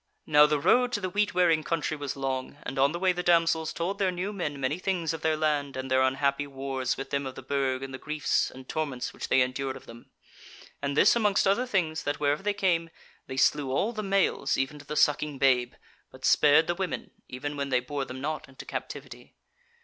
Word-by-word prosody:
"Now 150 -1 +6
the 150 -1 +1
road 250 - +3
to - - +1
the 185 -2 -3
Wheat 205 -1 0
wearing 165 -3 +3
country 155 -1 -1
was 145 -2 -4
long, 135 0 -3
and 135 - -4
on 140 +1 +4
the 170 - -3
way 185 +1 +2
the 180 - -3
damsels 165 -2 +2
told 185 +4 -3
their 195 -2 +2
new 185 +3 -3
men 150 -7 -3
many 135 +5 -1
things 180 -4 -1
of 160 - -6
their 160 -1 +1
land 145 -3 0
and 130 0 -5
their 130 0 +4
unhappy 140 +2 +1
wars 135 -2 -3
with 135 0 -6
them 140 -1 -1
of 130 - -7
the - - -9
Burg 135 -1 -1
and 135 -1 -7
the 130 - -6
griefs 150 -1 0
and 130 0 -12
torments 145 -6 -3
which - - -6
they 130 - +4
endured 130 +1 -1
of - - -15
them. 115 0 -13 0.7
And 140 0 -2
this 205 - +6
amongst 210 -4 +2
other 235 +6 +2
things, 165 -8 0
that 145 0 -2
wherever 145 0 +1
they 205 +1 -1
came, 170 -4 +1 0.4
they 130 - -6
slew 140 +1 +2
all 205 - 0
the 215 - -3
males 195 -8 +1
even 135 +3 -2
to 145 - -13
the 150 - -4
sucking 150 -1 +2
babe, 125 -2 +2 0.4
but 130 0 -8
spared 150 +2 +5
the 175 - 0
women, 185 +1 -4 0.2
even 145 +3 -5
when 140 -1 -3
they 130 -2 +3
bore 140 +3 -4
them 130 0 -8
not 150 +1 -4
into 130 - -11
captivity. - - -7
145 Hz, 225 wpm, -28 LUFS, 135-170 Hz, 0.7 s, Now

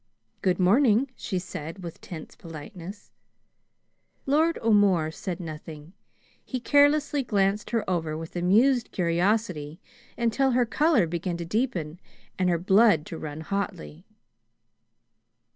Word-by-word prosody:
"Good 185 -1 +1
morning," 230 +6 +4
she 190 - -4
said 175 0 -7
with 170 -2 -8
tense 160 -3 -9
politeness. 170 +4 -10 1.1
Lord 315 +4 +2
O'More 200 -8 +3
said 180 +2 -5
nothing. 155 -1 -9 0.5
He 255 - -4
carelessly 290 +2 +3
glanced 205 -3 0
her 230 -2 -1
over 160 -4 -1
with 165 +2 -8
amused 225 +8 +3
curiosity, 175 -3 0 0.4
until 235 +3 +1
her 245 0 +3
color 265 - +3
began 170 +1 -3
to 170 - -5
deepen 175 - -2 0.4
and 185 -1 +2
her 170 - +2
blood 190 -2 +4
to 165 - -7
run 155 0 -6
hotly. 160 - -5
185 Hz, 120 wpm, -26 LUFS, 165-230 Hz, 1.1 s, morning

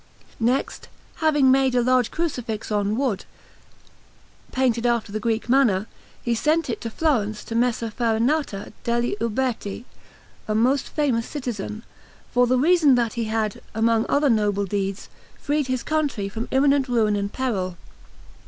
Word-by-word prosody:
Next, 245 +4 -1 0.3
having 295 -4 +4
made 265 -1 +3
a 245 - +3
large 255 -1 +3
Crucifix 245 -11 -3
on 205 +1 0
wood, 245 -8 -1 1.3
painted 245 -2 +1
after 235 -3 0
the 215 - -2
Greek 225 +1 -1
manner, 235 -7 +3 0.4
he 235 - 0
sent 305 +5 +1
it - - -5
to 230 - -4
Florence 220 -7 0
to - - -7
Messer 230 -1 0
Farinata 230 0 0
degli 235 -1 0
Uberti, 230 -2 -2 0.6
a 215 - 0
most 255 +5 +2
famous 260 -7 0
citizen, 225 -6 -5 0.5
for 245 0 +3
the 255 +1 +3
reason 305 -1 +5
that 235 -2 0
he 235 -2 -2
had, 220 -1 -2
among 225 0 +2
other 285 -1 +3
noble 205 -2 +1
deeds, 195 0 -3 0.3
freed 290 -1 0
his 255 -1 -1
country 290 -10 -1
from 225 +4 -5
imminent 275 0 +3
ruin 225 -4 +2
and 200 0 -2
peril. 190 -9 -2
235 Hz, 145 wpm, -23 LUFS, 215-265 Hz, 1.3 s, reason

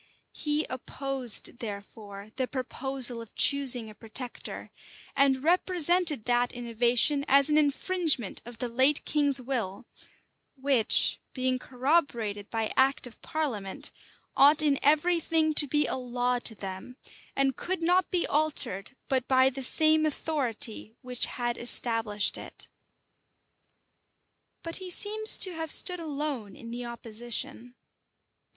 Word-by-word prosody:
He 300 0 -2
opposed, 260 -2 -2
therefore, 205 -1 -10
the 255 -1 -2
proposal 260 -2 -1
of 230 - -14
choosing 260 -5 +4
a 215 - -12
protector; 230 +3 -7 0.4
and 270 -1 +1
represented 345 - +2
that 245 0 0
innovation 245 +4 +1
as 280 +2 +3
an 300 - +3
infringement 300 - 0
of 240 -1 -12
the 245 - -4
late 260 +5 +2
king's 285 -3 +1
will, 235 -6 -5 0.7
which, 265 -4 +3
being 255 -1 -1
corroborated 245 -7 -2
by 225 -1 -3
act 270 0 +1
of 245 - -13
parliament, 285 -3 -4 0.4
ought 290 +2 +5
in 285 -2 +1
every 310 +4 +2
thing 320 -1 0
to 295 -1 +6
be 295 +2 0
a - - -3
law 245 0 -2
to 230 -2 -3
them, 195 +6 -9 0.4
and 270 -1 0
could 365 -2 -4
not 360 +2 +1
be 355 -2 0
altered 275 -8 +1
but 260 -2 -2
by 260 0 +3
the 270 +1 -7
same 310 +3 +5
authority 245 -8 -2
which 250 -1 0
had 240 -1 -4
established 225 -3 0
it. - - -11 2.0
But 330 0 -6
he 375 -1 -9
seems 430 +4 +3
to 370 - +4
have 320 -1 -6
stood 360 -1 +5
alone 285 - -5
in 230 -1 -11
the 240 +1 -6
opposition. 235 +1 -5
260 Hz, 130 wpm, -27 LUFS, 235-300 Hz, 2.0 s, to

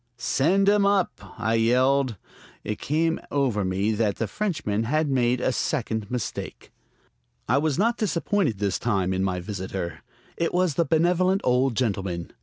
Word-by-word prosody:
"Send 180 +11 +2
him 205 0 +4
up!" 200 -2 +2 0.3
I 110 - 0
yelled. 125 +1 +2 0.5
It 105 - -4
came 160 +3 0
over 130 -8 0
me 95 +3 0
that 105 -2 0
the 115 - -2
Frenchman 150 - -2
had 150 +4 0
made 125 -1 +2
a 130 - +1
second 110 -6 -2
mistake. 125 -4 -5 0.8
I 130 +5 +3
was 155 -1 0
not 230 +5 +2
disappointed 185 - 0
this 100 -1 -1
time 95 -5 0
in 95 0 0
my 90 -2 -1
visitor. 90 -3 -5 0.4
It 170 +1 -1
was 180 -3 +2
the 165 +4 +1
benevolent 180 +4 +2
old 125 0 +2
gentleman. 95 -8 -2
125 Hz, 155 wpm, -25 LUFS, 105-165 Hz, 0.8 s, him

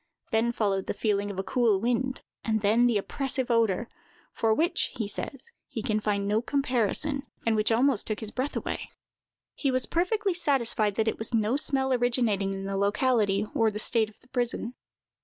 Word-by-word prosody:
Then 225 +2 +2
followed 200 -4 -1
the - - -2
feeling 205 -2 0
of 200 - -6
a 190 - -1
cool 225 -2 +2
wind; 245 +4 -1 0.2
and 220 -1 0
then 225 +4 +4
the 235 -3 +2
oppressive 260 +4 0
odor, 230 -1 +2 0.5
for 225 - +1
which, 325 - +2
he 220 - -2
says, 275 - -5 0.2
he 225 -5 -5
can 215 -1 0
find 200 -1 -1
no 210 +2 +2
comparison, 275 +2 0 0.2
and 225 -1 +2
which 215 +1 +1
almost 240 0 +3
took 215 -1 -2
away - - -13
his 215 -1 -4
breath. 260 +5 -2 1.0
He 275 - -1
was 255 -1 +3
perfectly 380 +3 0
satisfied 245 - +1
that 220 +1 0
it 220 - -1
was 225 +2 -3
no 220 +2 +2
smell 265 -2 +1
originating 235 -5 +1
in 195 0 -5
the 195 0 -2
locality 205 0 +2
or 225 -1 +3
the 210 - -5
state 220 0 +1
of 215 - -22
the 250 - -24
prison. 240 -1 -2
230 Hz, 190 wpm, -27 LUFS, 210-255 Hz, 1.0 s, then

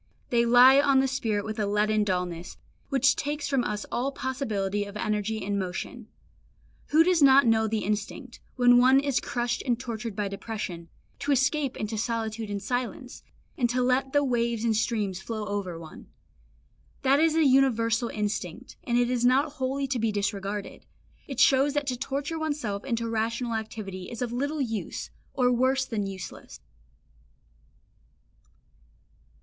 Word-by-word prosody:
They 235 -1 +3
lie 250 +3 +8
on 275 -2 +4
the 270 - +2
spirit 225 -6 -1
with 220 +1 -5
a 210 - 0
leaden 210 +1 +2
dullness, 180 -3 -3 0.3
which 275 -1 +3
takes 295 +1 -3
from 270 -3 +1
us 210 -2 -3
all 260 +3 -1
possibility 215 -8 -2
of 200 0 -8
energy 215 0 -2
and 200 0 -1
motion. 190 +5 -5 0.8
Who 315 +2 +5
does 355 -2 +2
not 275 -1 +7
know 220 -1 +3
the 220 0 -1
instinct, 215 +5 -4 0.2
when 245 -1 +6
one 260 +2 +6
is 280 -2 0
crushed 240 0 -2
and 240 -3 0
tortured 230 -4 -5
by 205 0 -1
depression, 195 -4 -6 0.3
to 285 - -1
escape 275 +1 +1
into 215 0 -3
solitude 225 -1 -3
and 205 -1 -3
silence, 245 +2 -4 0.3
and 240 -2 +1
to 250 +1 +1
let 255 +1 +1
the 290 +1 +3
waves 235 -3 0
and 225 -2 +2
streams 210 -4 -1
flow 215 -1 -4
over 200 -4 -3
one. 165 -1 -11 1.0
That 275 +2 +4
is 320 0 +3
a 325 -1 +4
universal 235 -4 +3
instinct, 210 +1 -4
and 240 -1 0
it 245 0 +2
is 245 -1 0
not 270 +5 +3
wholly 275 -1 -2
to 260 -2 -2
be 225 -1 +1
disregarded; 200 0 -3 0.4
it 270 -3 -5
shows 275 +2 +4
that 290 -1 0
to 255 -2 -1
torture 280 +5 -3
oneself 285 -11 -3
into 230 -3 -1
rational 230 +2 -1
activity 210 -4 -5
is 235 +1 -4
of 240 -1 -4
little 285 +4 -1
use, 225 -5 -4 0.2
or 250 -2 +3
worse 260 +2 +2
than 210 -5 -3
useless. 190 -2 -9
235 Hz, 160 wpm, -27 LUFS, 210-265 Hz, 1.0 s, lie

